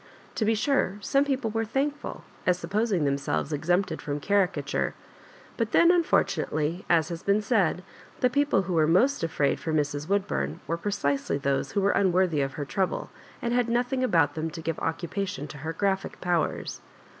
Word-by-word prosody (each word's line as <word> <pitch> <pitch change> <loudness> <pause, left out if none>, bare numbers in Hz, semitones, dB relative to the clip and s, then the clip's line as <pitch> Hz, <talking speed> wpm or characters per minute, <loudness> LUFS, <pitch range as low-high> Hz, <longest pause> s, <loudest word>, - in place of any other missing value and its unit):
To 220 - -1
be 225 +1 +3
sure 215 -3 +1
some 275 +5 +2
people 265 -5 -1
were 225 +1 0
thankful, 280 +6 -3 0.2
as 180 -1 +4
sup 175 0 -8
posing 205 -6 +1
themselves 140 +2 -1
exempted 175 +6 0
from 145 0 -3
caricature; 200 +3 0 0.6
but 230 -2 -1
then 340 +1 +6
unfortunately, 170 - +1
as 165 -2 +3
has 170 -1 -5
been 200 +2 +2
said, 195 -6 +1 0.4
the 250 - +4
people 280 -6 +2
who 185 0 -3
were 160 -2 +3
most 240 - +3
afraid 150 -4 +1
for 160 - -3
Mrs. 145 -1 -1
Woodbum 190 - -1
were 165 - -1
precisely 165 -8 -1
those 140 -1 -1
who 200 - +1
were 200 +1 +3
unworthy 180 -5 +2
of 135 -1 -2
her 145 - -4
trouble, 190 +5 -2 0.3
and 235 0 0
had 245 -1 +2
nothing 245 +2 0
about 165 -11 +3
them 160 0 -3
to 165 +1 -8
give 165 0 -2
occupation 175 +1 -3
to 145 - -9
her 160 +3 -3
graphic 195 +3 -1
powers. 175 -3 -1
185 Hz, 180 wpm, -27 LUFS, 155-220 Hz, 0.6 s, then